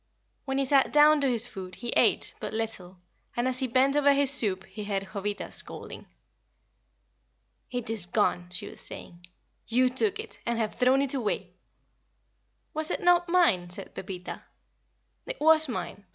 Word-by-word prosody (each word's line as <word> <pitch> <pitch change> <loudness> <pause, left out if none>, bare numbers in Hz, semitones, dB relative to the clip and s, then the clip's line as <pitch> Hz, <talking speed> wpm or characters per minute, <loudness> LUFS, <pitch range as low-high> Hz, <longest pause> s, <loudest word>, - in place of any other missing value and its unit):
When 270 -1 -2
he 275 - +1
sat 270 0 +3
down 300 0 +6
to 275 - +2
his 235 -2 +3
food 190 -6 -8
he 240 - -6
ate - - +2
but - - -5
little, 205 -5 -4 0.4
and 240 +1 +1
as 255 0 0
he 260 - +1
bent 260 +3 +2
over 285 -1 +5
his 280 -1 +3
soup 200 -9 +2
he 210 - -8
heard 195 -1 -3
Jovita 205 0 -4
scolding. - - -8 1.6
"It 245 -2 -4
is 205 -6 0
gone," 175 0 0
she 180 - -4
was - - -8
saying. 170 0 -7 0.4
"You 250 +2 +3
took 395 - +1
it, 445 - -8
and 235 0 -1
have 220 -2 -1
thrown 260 +2 +3
it 275 - 0
away." 240 -7 -2 1.2
"Was 310 0 -2
it - - -1
not 350 0 +4
mine?" 230 - +3
said 190 +2 -9
Pepita. 185 -1 -7 0.9
"It - - -5
was 315 -1 +5
mine. 190 -2 -5
245 Hz, 165 wpm, -27 LUFS, 200-280 Hz, 1.6 s, down